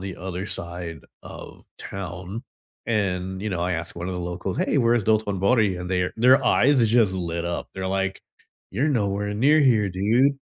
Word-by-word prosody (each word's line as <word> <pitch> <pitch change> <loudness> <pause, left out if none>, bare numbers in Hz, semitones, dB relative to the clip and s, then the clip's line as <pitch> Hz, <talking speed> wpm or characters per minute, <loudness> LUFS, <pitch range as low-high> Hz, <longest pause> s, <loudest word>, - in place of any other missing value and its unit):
the 95 -1 -6
other 95 +2 -5
side 85 -4 -5 0.2
of - - -11
town, 95 +3 -6 0.4
and, 95 -3 -1
you 110 - -2
know, 90 -2 -2
I 90 +1 0
asked 85 0 -5
one 85 +2 -4
of 95 - -3
the 90 - -4
locals, 90 +2 -4
hey, 145 - +1
where's 120 -3 +2
Dotonbori? 105 -1 +2
And 90 +1 -6
their 90 -1 0
their 130 +4 +5
eyes 130 -3 +4
just 110 -4 +3
lit 85 -2 -3
up. 85 0 -3
They're, 95 0 -4
like, 95 0 -1 0.5
"You're 145 +4 0
nowhere 105 -5 -1
near 145 +8 +4
here, 115 -8 +3
dude." 120 +9 +2
95 Hz, 180 wpm, -24 LUFS, 90-115 Hz, 0.5 s, their